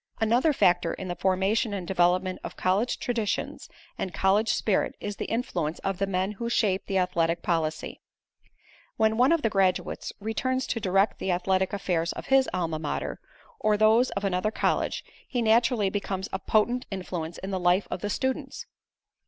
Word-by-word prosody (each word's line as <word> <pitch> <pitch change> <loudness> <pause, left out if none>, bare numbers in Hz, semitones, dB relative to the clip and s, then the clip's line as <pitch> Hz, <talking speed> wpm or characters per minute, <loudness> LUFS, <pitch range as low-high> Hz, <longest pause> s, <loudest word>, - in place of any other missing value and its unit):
Another 235 +8 +3
factor 175 - +2
in 190 - -6
the 175 - -2
formation 195 +5 +1
and 180 -3 -5
development 185 +1 +2
of - - -7
college 195 +6 +1
traditions 230 -4 -2 0.3
and 185 - -2
college 205 +4 +2
spirit 205 -4 +1
is 205 0 -5
the - - -3
influence 175 - -2
of 195 -1 -2
the 195 - +1
men 190 +1 0
who 235 +3 -4
shape 200 -5 +1
the 195 - 0
athletic 170 -2 +1
policy. 155 -2 -2 1.0
When 220 0 +3
one 250 +5 +4
of 335 -2 +2
the 225 - +3
graduates 190 -2 0
returns 255 +5 -1
to 230 - -2
direct 195 0 +1
the - - -3
athletic 185 +1 +1
affairs 175 -4 -1
of - - -7
his 270 -1 +5
Alma 165 -3 -2
Mater, 155 -2 -3 0.4
or 210 -1 +2
those 220 +4 +4
of 200 - -2
another 195 +1 0
college 220 - 0 0.2
he 250 - -2
naturally 230 -2 +3
becomes 195 -1 -3
a 190 - -1
potent 240 +5 +1
influence 175 -4 -5
in 190 - -6
the 190 - -1
life 180 +2 +2
of - - -3
the 205 - -2
students. 260 +5 -2
195 Hz, 175 wpm, -27 LUFS, 180-220 Hz, 1.0 s, his